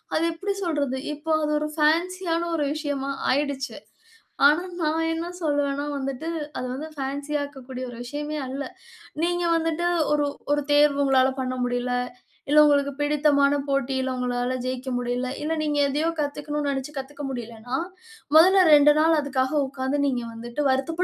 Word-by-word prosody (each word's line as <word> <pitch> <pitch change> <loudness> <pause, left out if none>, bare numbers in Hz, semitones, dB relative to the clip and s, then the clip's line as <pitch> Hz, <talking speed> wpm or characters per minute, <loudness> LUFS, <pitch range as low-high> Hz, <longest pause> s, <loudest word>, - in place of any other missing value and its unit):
அது 320 - +2
எப்டி 390 +5 -3
சொல்றது? 285 -6 -1 0.2
இப்போ 315 +2 -2
அது 300 0 0
ஒரு 305 0 -2
ஃபேன்ஸியான 335 +2 +1
ஒரு 300 -3 0
விஷயமா 285 -3 -3 0.2
ஆயிடுச்சு. 280 0 -1 0.7
ஆனா 305 +5 +3 0.2
நான் 315 +1 +1
என்ன 330 +1 -3 0.2
சொல்வேன்னா 285 -1 0
வந்துட்டு, 275 +3 -4 0.3
அது - - -3
வந்து 305 +4 -6
ஃபேன்ஸியாக்கக் 285 -1 -4
கூடிய 255 -1 -5
ஒரு 235 - -10
விஷயமே 295 +3 -4
அல்ல. 270 +2 -4 0.6
நீங்க 350 +1 +1
வந்துட்டு 330 +1 0 0.3
ஒரு 295 -1 +2 0.3
ஒரு 290 - +1
தேர்வு 290 -1 +4
உங்களால 265 -1 +4
பண்ண 255 0 -2
முடியல, 245 0 -1 0.6
இல்ல 300 +1 +6
உங்களுக்கு 285 -1 +3
பிடித்தமான 290 -1 +3
போட்டியில 265 -1 0
உங்களால 250 0 -1
ஜெயிக்க 255 +1 -3
முடியல, 245 +1 -2 0.2
இல்ல, 315 +2 -1
நீங்க 295 -1 0
எதையோ 300 +4 0
கத்துக்கணும்னு 295 0 -2
நெனைச்சு 270 +1 -3
கத்துக்க 280 +2 -6
முடியலைன்னா, 240 0 -5 0.6
மொதல்ல 370 +4 +7
2 295 0 +8
நாள் 320 +1 +4
அதுக்காக 265 -1 -1
உக்காந்து 265 +1 -2
நீங்க 250 -3 0
வந்துட்டு 235 +4 -5
வருத்தப்படுங்கன்னு 295 +7 0
285 Hz, 150 wpm, -25 LUFS, 265-305 Hz, 0.7 s, 2